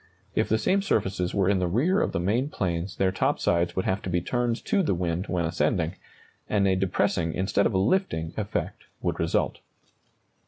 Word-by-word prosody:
If - - +1
the 110 - +3
same 195 - +2
surfaces 95 - 0
were 95 -2 +2
in 100 -1 +3
the 90 - +1
rear 150 - +2
of - - 0
the - - -1
main 115 +10 0
planes 90 - -2
their 95 -1 +2
top 95 - 0
sides 85 0 +1
would 95 - -1
have 95 +1 0
to - - -5
be 90 0 +1
turned 120 +5 -1
to 205 -3 +2
the 125 - +1
wind 85 +1 -2
when 85 -1 0
ascending, 80 +1 0 0.6
and 100 -2 +2
a 95 - +3
depressing 95 -2 0
instead 95 +2 +2
of - - -4
a - - +4
lifting 95 - 0
effect 105 -1 -3 0.2
would - - -1
result. - - 0
95 Hz, 200 wpm, -26 LUFS, 85-105 Hz, 0.6 s, a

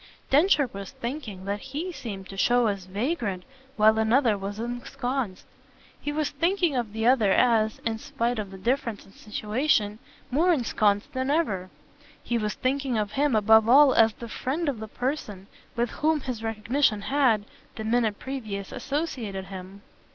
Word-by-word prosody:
Densher 295 -1 +4
was 195 -1 -6
thinking 235 -7 -6
that 200 +1 -2
HE 290 - -5
seemed 200 - -7
to 195 - -8
show 240 +5 +3
as 200 -4 -1
vagrant 205 - -2 0.3
while 220 +1 +5
another 225 +1 +3
was 200 +1 -5
ensconced. 245 -2 -3 0.6
He 295 - -2
was 300 0 -1
thinking 335 +1 +1
of 235 -4 -1
the 220 +1 -2
other 235 -5 +4
as 220 -1 +3
in 225 -1 -1
spite 245 -4 -2
of 205 -2 -4
the 190 - -10
difference 230 +1 -1
of 195 - -19
situation 215 0 0 0.3
more 330 +8 +3
ensconced 215 -8 +1
than 260 +1 -1
ever; 210 - 0 0.5
he 235 -1 0
was 210 -1 -2
thinking 265 -2 -1
of 210 -1 -1
him 285 -2 +1
above 220 +1 +5
all 275 +1 +7
as 225 -1 +5
the 235 - -9
friend 285 +8 -2
of 270 -6 -1
the 220 - -6
person 220 -6 -4 0.3
with 240 0 0
whom 310 0 +1
his 250 -4 -4
recognition 225 +1 +1
had, 245 -4 +2 0.3
the 220 - -5
minute 220 -2 +1
previous, 215 -8 -5
associated 250 - -3
him. 190 +1 -9
230 Hz, 165 wpm, -26 LUFS, 210-270 Hz, 0.6 s, all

